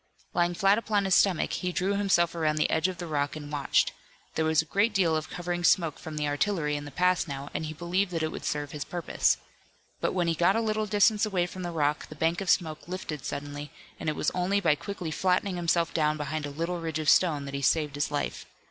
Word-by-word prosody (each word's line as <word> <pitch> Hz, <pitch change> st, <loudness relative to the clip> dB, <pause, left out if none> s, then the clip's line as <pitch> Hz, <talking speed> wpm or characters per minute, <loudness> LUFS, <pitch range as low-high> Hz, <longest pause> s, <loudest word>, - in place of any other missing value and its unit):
Lying 175 Hz, 0 st, +1 dB
flat 195 Hz, +4 st, +4 dB
upon 210 Hz, -3 st, 0 dB
his 190 Hz, -, +2 dB
stomach 185 Hz, -2 st, +3 dB
he 180 Hz, -, -2 dB
drew 185 Hz, +3 st, 0 dB
himself 195 Hz, -4 st, +2 dB
around 155 Hz, -2 st, 0 dB
the 155 Hz, -, +1 dB
edge 160 Hz, -, +2 dB
of 185 Hz, -1 st, -5 dB
the 175 Hz, -, -5 dB
rock 145 Hz, -3 st, -1 dB
and 145 Hz, -1 st, -8 dB
watched. 145 Hz, -2 st, +2 dB, 0.4 s
There 160 Hz, -, 0 dB
was 160 Hz, -1 st, +3 dB
a -, -, -18 dB
great 205 Hz, +6 st, +1 dB
deal 170 Hz, -4 st, +3 dB
of 155 Hz, 0 st, -3 dB
covering 175 Hz, 0 st, -3 dB
smoke 165 Hz, -4 st, +3 dB
from 155 Hz, -1 st, -7 dB
the 150 Hz, -1 st, 0 dB
artillery 150 Hz, +1 st, 0 dB
in 145 Hz, 0 st, -4 dB
the -, -, -7 dB
pass 180 Hz, +3 st, +1 dB
now, 140 Hz, 0 st, -6 dB
and 155 Hz, +1 st, -2 dB
he 155 Hz, -, -5 dB
believed 175 Hz, +5 st, 0 dB
that 165 Hz, -3 st, -2 dB
it 155 Hz, -, -1 dB
would -, -, -7 dB
serve 145 Hz, -1 st, -2 dB
his 150 Hz, -2 st, -4 dB
purpose. 175 Hz, +4 st, +1 dB, 0.6 s
But -, -, 0 dB
when 175 Hz, -2 st, +1 dB
he 165 Hz, -, +2 dB
got 175 Hz, +4 st, +3 dB
a -, -, +2 dB
little 215 Hz, -1 st, 0 dB
distance 210 Hz, 0 st, +3 dB
away 190 Hz, -5 st, +1 dB
from 185 Hz, +1 st, -8 dB
the 175 Hz, -, -3 dB
rock 150 Hz, -3 st, 0 dB
the 155 Hz, -, -10 dB
bank 165 Hz, +4 st, 0 dB
of 190 Hz, -, -3 dB
smoke 160 Hz, -3 st, +1 dB
lifted 175 Hz, -6 st, -5 dB
suddenly, 145 Hz, +1 st, -5 dB, 0.3 s
and 160 Hz, -, -1 dB
it 155 Hz, -, -2 dB
was -, -, 0 dB
only 185 Hz, +3 st, +1 dB
by 165 Hz, -6 st, +3 dB
quickly 175 Hz, +1 st, -5 dB
flattening 185 Hz, +3 st, +1 dB
himself 170 Hz, -1 st, +1 dB
down 155 Hz, -1 st, +1 dB
behind 150 Hz, 0 st, -3 dB
a -, -, -5 dB
little 165 Hz, +4 st, -3 dB
ridge 160 Hz, -2 st, -3 dB
of 155 Hz, -1 st, -3 dB
stone 150 Hz, -2 st, +4 dB
that 140 Hz, -, -7 dB
he 140 Hz, -, -3 dB
saved 150 Hz, 0 st, +2 dB
his 145 Hz, 0 st, -1 dB
life. 145 Hz, -1 st, -3 dB
165 Hz, 245 wpm, -28 LUFS, 150-185 Hz, 0.6 s, flat